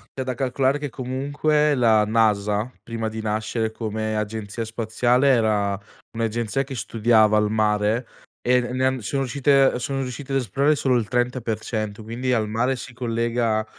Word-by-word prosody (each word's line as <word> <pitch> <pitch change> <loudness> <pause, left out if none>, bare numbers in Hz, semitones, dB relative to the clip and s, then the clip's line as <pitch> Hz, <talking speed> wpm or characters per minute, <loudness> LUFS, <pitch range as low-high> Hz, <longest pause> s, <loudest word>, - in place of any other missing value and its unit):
c'è 130 - -3
da 130 -1 -2
calcolare 135 +2 +1
che 145 -2 -5
comunque 145 +4 0
la 110 -4 +4
NASA, 105 0 +1
prima 115 -1 -4
di 110 0 -5
nascere 110 +1 -1
come 110 -1 -3
agenzia 105 +1 -4
spaziale, 120 +4 +1
era 105 -5 +2 0.4
un'agenzia 115 +3 -1
che 135 0 -7
studiava 110 -2 +3
il 105 0 +2
mare, 110 +2 +1 0.4
e 125 0 +4
ne 120 0 -4
ne 130 +1 0
han 130 -1 0
sono 135 +6 -2
riuscite 135 0 +3
sono 135 +3 -2
riuscite 130 +2 -6
ad 135 - +3
esplorare 140 +5 +1
solo 130 -3 +1
il 110 - -3
30%, 115 -3 -2
quindi 120 +4 -2
al 110 -3 +1
mare 125 +4 0
si 125 - -9
collega 115 -2 0
115 Hz, 160 wpm, -23 LUFS, 110-130 Hz, 0.4 s, la